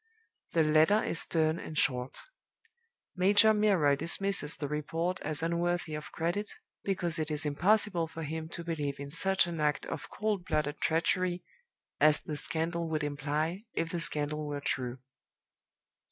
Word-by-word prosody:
"The 165 - +4
letter 155 +7 +4
is 165 - -2
stern 160 0 0
and 155 - -7
short. 125 -2 +1 1.0
Major 205 +4 +5
Milroy 195 -9 +3
dismisses 170 0 +2
the 145 - -4
report 165 +5 -2
as 155 +1 -2
unworthy 170 0 -1
of 150 0 -6
credit, 175 +6 -2 0.3
because 175 -4 -1
it 155 0 -1
is 155 0 -2
impossible 175 +3 +2
for 160 0 -7
him 160 +1 -4
to 170 - -6
believe 150 -4 -3
in 140 0 -7
such 190 +5 +3
an 170 -2 -4
act 150 -1 +1
of - - -6
'cold 210 -4 -2
blooded 150 -3 -1
treachery,' 175 +2 +1 0.6
as 150 0 +5
the 150 - -5
scandal 165 +2 -2
would 155 -1 -1
imply, 150 +7 -2
if 165 0 -1
the 175 - -2
scandal 150 -1 0
were 145 -1 -3
true. 125 -2 -2
160 Hz, 155 wpm, -31 LUFS, 150-175 Hz, 1.0 s, Major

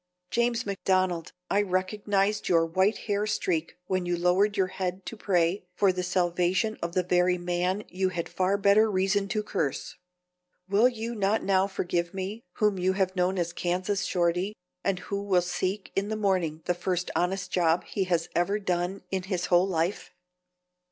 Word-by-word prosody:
James 235 0 +1
McDonald, 185 -3 0 0.2
I 200 - +4
recognized 200 +1 0
your 165 -2 +4
white 190 +6 +2
hair 205 0 0
streak 170 -6 -1
when 185 -2 -1
you 175 0 0
lowered 190 +4 +2
your 190 - +3
head 185 0 -3
to - - -6
pray 180 -3 +1
for 195 -1 +3
the 180 - -2
salvation 180 +4 +1
of 170 0 -3
the 185 - +2
very 180 0 +2
man 180 +2 -1
whom - - -18
you 185 +1 0
had 170 -2 -3
far 190 +2 +1
better 205 +2 +4
reason 195 +1 +1
to 215 +1 -1
curse. 165 -9 -2 0.7
Will 205 +5 +5
you 230 -1 -5
not 210 0 +1
now 195 0 +3
forgive 175 -2 -2
me, 195 +4 -4
whom 210 -3 +1
you 185 +1 +2
have 190 -1 0
known 185 +1 +1
as 170 -1 -1
Kansas 185 +3 -1
Shorty, 180 +3 0 0.3
and 195 - +1
who 200 +2 -4
will 195 -3 +3
seek 185 +3 -2
in 200 +1 0
the 220 - -2
morning 180 -7 0
the 180 - +2
first 180 0 -2
honest 180 0 -1
job 170 -1 +2
he 195 - -2
has 170 -2 0
ever 185 +4 +2
done 185 -1 -2
in 190 -1 0
his 180 -3 -1
whole 175 +2 +5
life?" 175 +1 -1
185 Hz, 180 wpm, -27 LUFS, 180-200 Hz, 0.7 s, Will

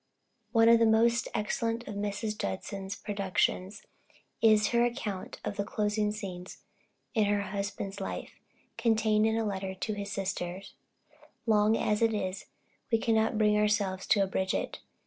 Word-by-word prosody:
One 225 -1 +5
of 230 0 +7
the 230 - +5
most 230 +2 +3
excellent 230 +2 -1
of 210 - -5
Mrs. 205 +1 -2
Judson's 195 - -4
productions 200 0 -1 0.6
is 215 -2 +5
her 235 0 +3
account 215 -5 -3
of 205 - -3
the 200 - 0
closing 210 0 0
scenes 185 -4 -7 0.5
in 220 -4 +3
her 205 0 +1
husband's 200 0 -4
life, - - -5 0.5
contained 220 -2 +3
in 220 0 +1
a 225 - 0
letter 190 -2 -3
to 215 +3 -3
his 200 -1 -5
sister. 185 -1 -3 0.8
Long 215 0 +4
as 210 +1 0
it 225 -1 +3
is, 190 -2 -3 0.4
we 225 - +5
cannot 220 -1 +1
bring 210 -1 +4
ourselves 205 -3 +1
to 205 - +4
abridge 190 0 -1
it. - - -3
210 Hz, 150 wpm, -30 LUFS, 195-220 Hz, 0.8 s, of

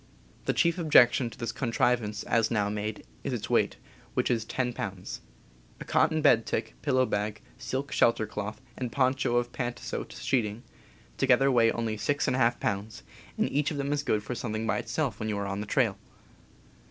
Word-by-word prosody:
The - - +1
chief 170 +1 +2
objection 130 -6 +5
to - - -14
this 115 -2 -3
contrivance, 115 -3 0
as 115 -2 +2
now 105 -3 +1
made, 105 +1 -4 0.2
is - - -2
its - - -4
weight, - - +2 0.4
which - - +1
is 115 -3 0
10 125 +1 -1
pounds. 95 -5 -5 0.6
A - - -7
cotton 155 -1 +2
bed 115 -6 +5
tick, - - -2
pillow 130 0 +2
bag, 105 -1 -2 0.2
silk 135 +2 -3
shelter 115 -1 +3
cloth, 105 0 -5 0.2
and 125 -2 -4
poncho 130 -1 +1
of 120 0 +1
pantasote 120 -1 -4
sheeting, 115 -3 -1 0.5
together 135 +1 +4
weigh 115 -2 +4
only 115 -2 -2
6^ 125 -1 +1
pounds, 105 +1 -3 0.3
and - - +2
each 145 0 +1
of 150 - -4
them 140 +1 -1
is 145 - 0
good 110 -7 0
for 125 - -4
something 110 -2 -3
by 110 - +1
itself 135 -10 -2
when 110 - -2
you 105 - -1
are 100 - -2
on 100 +1 -3
the 105 - -6
trail. - - +1
120 Hz, 180 wpm, -28 LUFS, 105-130 Hz, 0.6 s, objection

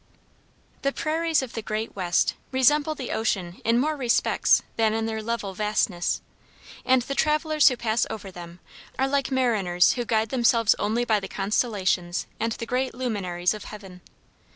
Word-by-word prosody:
The 275 - +1
prairies 320 0 0
of 250 - -8
the 225 - -4
great 215 +1 -4
West 180 -3 +1 0.2
resemble 295 +4 +3
the 260 -4 -5
ocean 190 -5 -2
in 230 +1 +2
more 305 +5 +1
respects 250 -4 +2
than 220 -1 +2
in 225 0 -1
their 220 -1 -3
level 215 -3 -3
vastness, 210 -3 -1 0.6
and 260 -1 +3
the 275 - -4
travelers 305 +1 +3
who 250 - -3
pass 230 0 0
over 205 -3 -7
them 175 -1 -11 0.4
are 265 - +1
like 275 -1 0
mariners 215 -9 +2
who 245 - -2
guide 220 -1 0
themselves 235 -3 +3
only 225 +4 0
by 220 -3 +2
the 195 - -6
constellations 195 -4 -1
and 225 +1 0
the 230 - -6
great 250 +2 -1
luminaries 195 -8 -1
of 210 - -8
heaven. 195 -4 -10
225 Hz, 165 wpm, -25 LUFS, 200-260 Hz, 0.6 s, resemble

